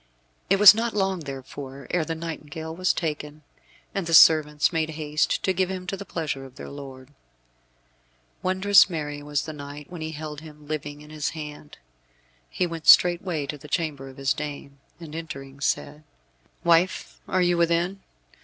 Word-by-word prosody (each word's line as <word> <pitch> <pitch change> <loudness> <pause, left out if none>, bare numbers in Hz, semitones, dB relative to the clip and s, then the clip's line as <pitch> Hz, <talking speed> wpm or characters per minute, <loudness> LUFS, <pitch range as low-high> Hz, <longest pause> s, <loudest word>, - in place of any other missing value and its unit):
It 195 - +4
was 210 0 +11
not 225 0 -2
long 195 -2 0
therefore 135 -1 -8
ere 175 -2 +1
the 165 +1 -4
nightingale 160 -1 -6
was 185 +1 +2
taken, 150 -2 -4 0.5
and 195 -4 -2
the 165 - +4
servants 150 0 +6
made 160 -1 0
haste 150 -1 -1
to 190 - +2
give 185 0 0
him 185 -1 -5
to 195 - -3
the 200 +1 -8
pleasure 150 -5 -3
of 130 -1 -13
their - - -9
lord. 135 -1 -10 1.3
Wondrous 190 +1 +5
merry 150 -4 -4
was 145 -2 -2
the 155 - -6
knight 145 +1 -9
when 175 -3 -7
he 160 0 -4
held 150 -1 -7
him 150 -1 -13
living 145 -1 -5
in 150 0 -14
his 155 -1 -2
hand. 150 -1 -9 0.7
He 180 - -1
went 165 -2 -6
straightway 175 -3 +5
to 145 +1 -6
the 150 - -12
chamber 145 -4 -2
of 130 - -14
his 135 0 +1
dame, 140 -2 -7 0.2
and 160 -3 -10
entering, 140 -4 -8
said, 150 +2 -2 0.6
"Wife, 170 +2 +2
are 185 -1 +1
you 175 0 +3
within? 170 +3 +1
155 Hz, 170 wpm, -25 LUFS, 145-175 Hz, 1.3 s, was